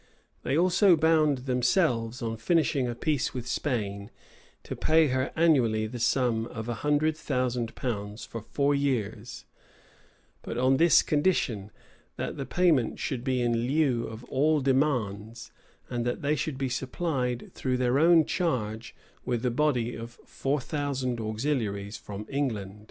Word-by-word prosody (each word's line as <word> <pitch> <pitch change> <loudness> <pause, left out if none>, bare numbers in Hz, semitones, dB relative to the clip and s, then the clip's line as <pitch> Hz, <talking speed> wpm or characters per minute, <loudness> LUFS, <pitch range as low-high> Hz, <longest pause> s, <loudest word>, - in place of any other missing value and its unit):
They 135 +4 0
also 180 +2 +5
bound 155 -4 +2
themselves, 125 -2 +1
on 115 -1 -3
finishing 140 0 +1
a 120 - -3
peace 145 0 -1
with 125 -2 -4
Spain, 100 -7 -2 0.5
to - - -6
pay 160 -1 +3
her 130 0 0
annually 125 -10 +3
the 120 +3 -6
sum 115 -2 +1
of 110 -2 -7
a 120 - -1
hundred 150 +1 +2
thousand 125 -6 -2
pounds 105 -3 -4
for 115 - -7
four 140 +6 0
years; 125 -4 -2 1.0
but - - -6
on 130 +2 +3
this 165 0 +6
condition, 145 - 0 0.5
that - - -4
the 135 - -5
payment 165 -10 +2
should 125 -4 -3
be 130 -2 0
in 120 0 0
lieu 135 -4 +1
of 110 +1 -9
all 150 +5 +2
demands, 120 -6 -1 0.4
and 120 -1 -2
that 120 +4 -3
they 145 +2 +2
should 145 -1 -3
be 135 0 -1
supplied, 130 -1 -2
though 130 - -2
at - - +1
their 125 +2 +2
own 165 0 +6
charge, 115 -10 -2 0.3
with 120 -1 -2
a 125 - +2
body 125 -3 +1
of 115 +1 -8
four 140 +2 -1
thousand 135 -3 -2
auxiliaries 110 -3 -2
from 105 +1 -8
England. 110 -8 -3
125 Hz, 150 wpm, -28 LUFS, 115-145 Hz, 1.0 s, this